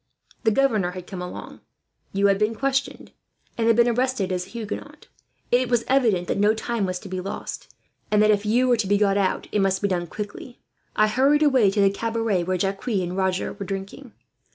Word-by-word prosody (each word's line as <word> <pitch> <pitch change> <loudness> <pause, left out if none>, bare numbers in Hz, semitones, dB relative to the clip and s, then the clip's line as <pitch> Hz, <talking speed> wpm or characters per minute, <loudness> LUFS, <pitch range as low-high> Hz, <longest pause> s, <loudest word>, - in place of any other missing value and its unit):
The - - +6
governor 215 -7 +1
had 180 -1 -8
come 185 -2 -7
along, 180 - -8 0.5
you 200 +1 +1
had 195 -1 +3
been 215 +2 +1
questioned, 270 +2 -2 0.4
and 225 -1 0
had 230 - +5
been 235 +1 +4
arrested 245 -5 0
as 180 0 -2
a - - -16
Huguenot. 225 -3 -7 0.5
It 245 0 +3
was 240 -2 +2
evident 225 -10 +2
that - - -1
no 210 +2 +4
time 225 -2 -2
was 185 0 -2
to 205 - -9
be 185 -1 -4
lost 195 - -6 0.4
and 210 - +3
that, 215 - +5
if 205 -1 +1
you 240 +4 +2
were 245 -1 +3
to 215 -3 -1
be 205 +1 +3
got 200 -1 +2
out, 195 -2 0
it 210 - +1
must 190 -1 +2
be 200 - 0
done 175 -3 -1
quickly. 210 +7 -8 0.4
"I 215 - +4
hurried 275 +7 +3
away 260 -8 +4
to 200 +1 +1
the 195 0 +4
cabaret 225 -4 -1
where 185 +1 0
Jacques 195 +5 -3
and 185 -6 -1
Roger 190 -1 -1
were 200 -1 -7
drinking. 200 +6 -6
210 Hz, 215 wpm, -24 LUFS, 195-235 Hz, 0.5 s, The